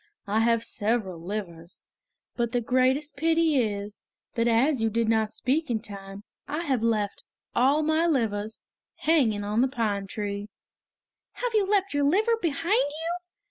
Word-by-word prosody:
I 210 +2 +1
have 230 0 +3
several 210 -6 -1
livers. 175 -3 -6 0.5
But 235 -1 -1
the 245 - +2
greatest 260 +5 +1
pity 325 -1 +3
is, 205 -2 -4 0.3
that 230 0 +1
as 245 +3 +3
you 225 - +2
did 230 +1 0
not 220 -1 +2
speak 300 +5 -1
in 230 -2 +1
time, 200 -2 -9 0.2
I 310 +3 -2
have 265 -7 0
left 215 -3 0 0.3
all 275 +5 +3
my 315 +2 +2
livers 220 -7 -1 0.4
hanging 245 -11 +2
on 210 +3 +1
the 260 - +4
pine 210 -6 -1
tree." 205 0 -4 0.8
"Have - - -3
you 415 -3 +3
left 395 -3 +2
your 285 0 +1
liver 425 +10 +3
behind 335 - +1
you?" 325 +4 -3
235 Hz, 155 wpm, -27 LUFS, 210-305 Hz, 0.8 s, the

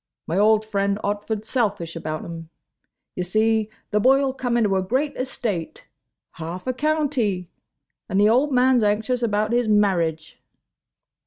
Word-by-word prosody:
"My 165 - -3
old 215 +1 +4
friend. 200 -2 0
Otford's 205 +1 -3
selfish 205 -9 -1
about 155 -1 -4
him. 165 -1 -8 0.7
Ye - - -3
see, 215 +3 +1 0.2
the 210 - +2
boy 270 +5 +4
'll 265 - -1
come 245 -2 -1
into 210 -4 +2
a 190 - +2
great 260 +10 -1
estate. 220 -9 -4 0.5
Half 170 +3 -7
a 255 - -1
county. 260 - -1 0.6
And 190 - +1
the 205 - +5
old 260 +7 +3
man's 255 -1 +4
anxious 220 +4 0
about 215 -1 0
his 240 -1 +2
marriage." 170 -7 +1
215 Hz, 150 wpm, -23 LUFS, 190-250 Hz, 0.7 s, the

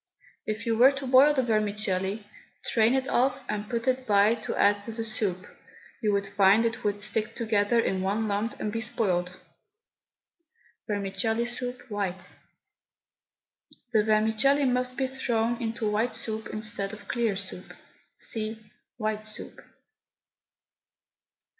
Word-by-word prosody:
If 215 +1 -3
you 230 -1 +1
were 260 +3 +8
to 275 0 -5
boil 265 +3 +6
the 260 - +2
vermicelli, 210 -2 0 0.4
strain 225 +2 +3
it 265 0 0
off, 265 +2 +1
and 210 0 -3
put 235 0 -2
it 255 0 0
by 205 +1 +5
to 230 - -4
add 205 0 +3
to 230 - -5
the 225 0 -4
soup, 195 -4 -1 0.6
you 215 -3 +2
would 200 0 +1
find 200 +2 +4
it 225 -1 -2
would 205 -1 0
stick 215 +1 -1
together 220 0 +2
in 190 -4 0
one 205 +4 0
lump 210 +3 -2
and 210 - -2
be 225 +1 -2
spoilt. 185 -6 0 1.6
VERMICELLI 205 +3 -1
SOUP, 245 +1 -2
WHITE. 190 -3 -3 1.6
The 215 -2 +4
vermicelli 220 +6 +3
must 250 0 0
be 270 - +1
thrown 240 -3 -1
into 225 -2 -2
white 220 +4 0
soup 220 0 -4
instead 215 -2 -3
of 205 -2 -11
clear 230 -5 0
soup. 190 -2 -6 0.4
(See 220 0 -4 0.4
WHITE 215 -1 -2
SOUP.) 215 - -6
220 Hz, 140 wpm, -27 LUFS, 205-235 Hz, 1.6 s, were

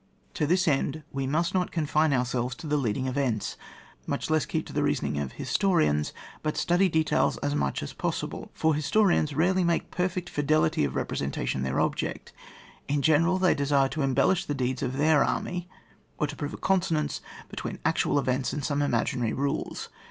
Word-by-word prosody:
To 150 - 0
this 180 +3 +2
end 145 +1 +1
we 135 -1 -2
must 165 +5 0
not 185 -1 +1
confine 155 -1 +1
our 125 -2 +2
selves 125 +1 -2
to 160 - -10
the 150 -1 0
leading 130 -2 0
events, 130 -4 -1 0.5
much - - -2
less 155 -2 +2
keep - - -2
to - - -10
the - - +1
reasoning 70 - 0
of 70 -3 -4
historians, 75 - +1 0.3
but 155 -1 -2
study 180 +2 +3
details 160 -1 +2
as 145 0 0
much 70 - -1
as - - -5
is - - -10
possible. - - -3
For 160 0 +2
historians 155 0 +2
rarely 180 +4 +3
make 170 -1 0
perl'ect 180 0 -1
fide 145 -1 -3
lity 155 - +3
of 65 - -7
representation 70 -1 -2
their 65 0 -1
object: - - -2 0.5
in 140 0 0
general, 165 +5 +4
they 185 -1 +4
desire 140 -1 +2
to 155 - -3
embellish 135 +7 +2
the 145 - -2
deeds 130 -1 -1
of 130 -1 -2
their 150 0 +4
army, 180 -1 -2 0.5
or - - +1
to 150 0 -6
prove 145 +2 -4
a - - -9
con 190 -1 +2
sonance 160 -4 -1 0.3
between - - -5
actual - - +2
events 130 -1 0
and 145 - -3
some 145 -1 0
imaginary 120 -3 0
rules. 140 +1 -2
145 Hz, 190 wpm, -27 LUFS, 130-165 Hz, 0.5 s, general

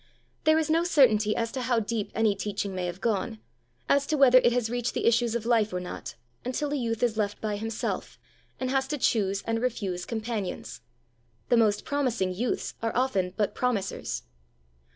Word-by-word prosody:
There 315 0 +5
is 320 -1 +1
no 325 +2 +3
certainty 225 -11 +4
as 230 0 -1
to 260 - -3
how 240 -1 +2
deep 220 -1 -3
any 220 -2 +3
teaching 200 0 -3
may 180 -1 -2
have 175 +2 -6
gone 200 - -1 0.5
as 280 0 +3
to 310 - +1
whether 255 -2 +7
it 240 - +3
has 240 -2 +1
reached 245 +1 -2
the - - -1
issues 235 0 +3
of 230 -2 -2
life 225 -3 +3
or 180 - -2
not, 130 -8 -7 0.3
until 285 +4 -2
a - - +1
youth 230 -3 -1
is 230 -3 +1
left 205 -1 -1
by 215 -1 -2
himself, 220 +2 -3 0.4
and 255 0 -1
has 265 0 +1
to 300 - -2
choose 200 -6 +1
and 225 0 -1
refuse 200 -8 -2
companions: 220 -4 -4 0.7
the 240 - +5
most 210 -2 +2
promising 240 -10 0
youths 230 +6 -2
are 225 0 -2
often 195 -8 0
but 210 -2 +1
promisers. 200 - -2
225 Hz, 190 wpm, -27 LUFS, 205-250 Hz, 0.7 s, whether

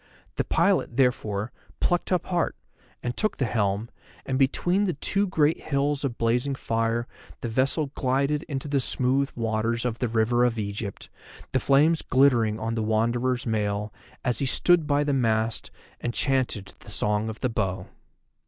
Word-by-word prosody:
The - - +2
pilot, 170 -7 +1
therefore, 115 -4 +1 0.3
plucked 175 +1 0
up 180 - +1
heart, 175 -2 0 0.5
and 120 0 -2
took 215 - 0
the 135 - +1
helm, 105 -1 0 0.4
and 130 0 -1
between 175 +9 +2
the 180 - -1
two 200 +7 +1
great 160 -4 +2
hills 145 0 0
of 130 -4 -2
blazing 120 +4 +1
fire 115 -1 -1 0.4
the - - -3
vessel 135 +5 0
glided 140 +2 0
into 135 0 -3
the 140 -1 +1
smooth 135 +2 +1
waters 115 +1 -1
of 120 -2 -2
the 125 - 0
River 115 +2 +2
of 120 -2 +1
Egypt, 100 -1 -5 0.4
the 130 - +2
flames 150 +5 +4
glittering 120 -5 +3
on 115 +1 -2
the 115 - -1
Wanderer's 120 +3 0
mail 105 -2 -1 0.3
as 125 -3 0
he 135 - 0
stood 170 +3 +3
by 145 0 +2
the 145 -1 0
mast 115 -3 0 0.3
and 120 -1 -3
chanted 130 -8 0
the - - -14
Song 105 +1 +1
of 110 - -8
the 130 - +1
Bow. 95 -5 -2
125 Hz, 165 wpm, -26 LUFS, 110-140 Hz, 0.5 s, flames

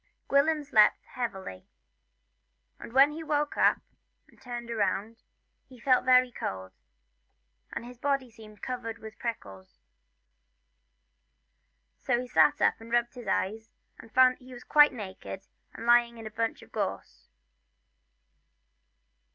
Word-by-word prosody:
Gwilym 300 +2 +2
slept 215 -7 +4
heavily, 190 - -6 1.1
and - - -10
when 270 +4 +6
he 315 +2 -7
awoke 295 -2 -1 0.9
turned 240 -2 -7
round, 215 0 -1
for - - -38 0.5
he 255 -2 -15
felt 255 +1 +2
very 255 -1 +5
cold, 95 - -6 1.0
and - - -6
his 245 0 -12
body 275 -3 -1
seemed 215 -2 -15
covered 240 -3 -5
with 220 -1 -12
prickles; 95 - -7 2.2
so 240 - 0
he 250 - -5
sat 290 +4 +3
up - - +2
and 230 +1 -12
rubbed 240 0 +1
his 245 -4 -10
eyes, 220 +4 -2 0.3
and 225 - -14
found 255 +1 +5
that - - -35
he 255 0 -12
was 245 - -11
quite 295 -1 +6
naked 195 -4 -8 0.3
and 230 - -8
lying 240 0 +4
in 225 - -10
a 215 - -7
bunch 225 +1 -3
of - - -18
gorse. 60 0 -5
235 Hz, 135 wpm, -28 LUFS, 220-255 Hz, 2.2 s, when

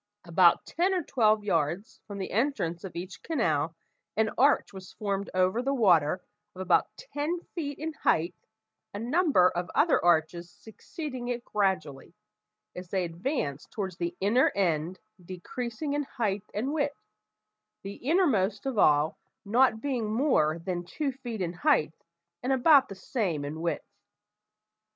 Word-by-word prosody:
About 175 0 +4
ten 370 +3 0
or 360 - 0
twelve 215 -6 +2
yards 170 +1 -1
from 205 -1 -7
the 190 - -5
entrance 205 - -1
of 185 -4 -8
each 180 +2 -7
canal, 165 - 0 0.4
an 220 0 +2
arch 280 -4 +3
was 190 -1 -10
formed 200 -2 -3
over 185 +5 +2
the 275 +2 0
water 180 - +3 0.3
of 185 - -7
about 180 -2 +3
ten 335 -7 -3
feet 290 -5 -4
in 315 +1 -4
height, 170 - +1 0.6
a - - -3
number 260 - +3
of 175 0 -3
other - - +3
arches 170 0 +2
succeeding 255 - -8
it 245 0 -3
gradually, 185 -7 -2 0.6
as 180 -1 -8
they 190 -1 0
advanced 165 - -3
towards 190 -5 -5
the 175 +1 -3
inner 220 +7 +3
end 175 -2 0 0.3
decreasing 235 - -5
in 290 - 0
height 210 -7 -2
and 255 +8 -2
width, 285 -4 -1 0.9
the 200 +1 -7
innermost 245 - +1
of 260 -6 -1
all 150 -1 +3 0.3
not 225 +1 +3
being 245 -7 -2
more 215 - +2
than 175 +1 -4
two 280 - -3
feet 245 -5 -6
in 175 -1 -2
height, 180 - +2 0.5
and 255 - -1
about 275 +1 +5
the 195 - -7
same 185 - -2
in 155 +3 -5
width. 170 0 -2
200 Hz, 150 wpm, -28 LUFS, 175-265 Hz, 0.9 s, about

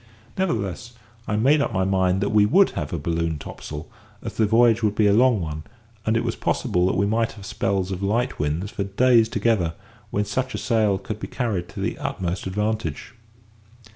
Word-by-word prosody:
Nevertheless, 120 - -2 0.3
I 105 - 0
made 140 +8 +4
up - - 0
my 95 - 0
mind 95 0 +2
that 100 - 0
we 105 -1 +5
would 185 - +4
have 75 - -4
a 85 - -2
balloon 80 +1 -1
topsail, 75 +2 -8 0.4
as 115 - -5
the 110 - +2
voyage 115 +1 +4
would 105 -2 +1
be 105 - +3
a 100 - +5
long 120 0 +4
one, 75 -2 -4 0.5
and 110 +1 +3
it - - 0
was - - -2
possible 90 0 0
that - - 0
we 100 - +2
might 115 +2 0
have 100 -3 -11
spells 95 0 -1
of 95 0 -4
light 115 +6 0
winds 75 +7 -1
for 100 - -2
days 115 +3 +3
together, 105 -7 +1 0.3
when 105 +1 -1
such 130 +4 -2
a - - -2
sail 110 -5 +1
could 100 +2 -6
be - - -5
carried 105 -9 -2
to - - -9
the - - -2
utmost 90 +1 -3
advantage. 110 +5 -2
105 Hz, 200 wpm, -23 LUFS, 95-115 Hz, 0.5 s, we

